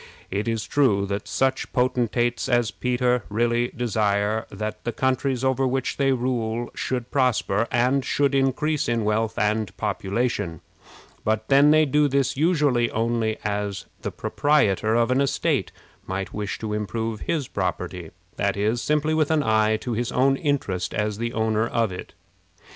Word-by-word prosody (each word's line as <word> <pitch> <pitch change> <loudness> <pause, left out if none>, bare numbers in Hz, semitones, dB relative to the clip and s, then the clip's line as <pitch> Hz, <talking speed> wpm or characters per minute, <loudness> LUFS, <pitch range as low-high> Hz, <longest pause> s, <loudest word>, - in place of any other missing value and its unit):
It 100 +4 -2
is 115 -2 -1
true 110 -9 +2
that 100 +1 -4
such 135 0 0
potentates 120 -1 0
as 120 -2 +2
Peter 125 -1 0
really 120 +3 +1
desire 110 -3 0
that 105 +2 -5
the 120 - -2
countries 130 0 0
over 130 0 +2
which 130 0 -1
they 135 -1 +2
rule 120 -2 -1
should 125 -2 -3
prosper, 115 -5 +1
and 125 +3 +2
should 140 +1 +1
increase 140 +2 +1
in 115 -1 0
wealth 110 +1 0
and 105 -1 0
population; 100 -3 -2 0.6
but 110 0 -1
then 140 +2 +6
they 155 +1 +5
do 150 +1 +3
this 135 -1 +1
usually 145 -6 +2
only 115 -1 0
as 105 -1 -2 0.2
the - - -3
proprietor 110 -7 +1
of 120 +1 +2
an 130 +2 +3
estate 140 - 0 0.4
might 95 +1 -4
wish 105 -1 -3
to 110 -1 -4
improve 110 +2 -3
his 145 0 -2
property, 90 -2 -3 0.3
that 100 0 0
is, 110 +4 0
simply 150 +1 +1
with 155 -2 +2
an 155 -2 +2
eye 110 -2 +3
to 120 - -3
his 120 +1 -2
own 135 +2 +3
interest 135 - -1
as 105 0 -1
the 115 0 -2
owner 110 0 0
of 115 -4 0
it. 90 - -8
120 Hz, 160 wpm, -24 LUFS, 105-130 Hz, 0.6 s, then